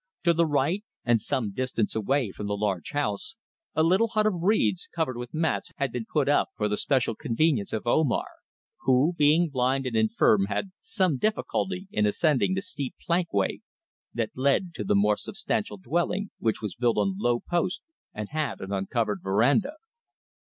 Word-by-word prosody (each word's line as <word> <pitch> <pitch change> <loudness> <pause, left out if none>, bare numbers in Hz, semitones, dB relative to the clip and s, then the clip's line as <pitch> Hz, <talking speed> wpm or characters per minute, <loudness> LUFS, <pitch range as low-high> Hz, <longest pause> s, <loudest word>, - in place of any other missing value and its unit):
To 170 -1 +4
the 170 0 +2
right 150 +7 +1 0.2
and 120 -2 +3
some 130 - -1
small 100 -2 -4
distance 125 -3 -1
away 115 +1 0
from 105 - -6
the 100 0 -1
large 100 -4 -1
house 145 - -2 0.4
a 160 - +3
little 185 +7 +4
hut 215 -1 +1
of 215 - +3
reeds, 190 -1 +2
covered 160 -7 -1
with 120 0 -6
mats, 160 0 -1
had 140 -4 -1
been 115 -2 -4
put 150 -3 +1
up 145 - +3
for 105 - +1
the 105 - 0
special 130 -1 +1
convenience 130 -2 0
of 110 - -3
Omar, 130 +2 +2 0.5
who, 135 +6 +3
being 155 +2 +4
blind 130 0 0
and 125 -3 -2
infirm, 110 -2 +3
had 105 - -2
some 185 -9 0
difficulty 195 -3 -1
in 105 0 +2
ascending 150 - +2
the 190 - -2
steep 145 -8 -4
plankway 170 - +1 0.5
that 115 -2 -2
led 140 +7 +1
to - - -4
the 105 - +1
more 105 +1 +3
substantial 105 - -3
dwelling, 175 - -1
which 110 -1 -1
was 105 - -3
built 120 -1 +1
on 100 -2 0
low 120 +2 +2
posts 175 +4 -1 0.3
and 105 -1 -6
had 150 -5 -2
an 95 - -7
uncovered 105 +1 -1
verandah. 125 - +2
130 Hz, 180 wpm, -27 LUFS, 110-165 Hz, 0.5 s, To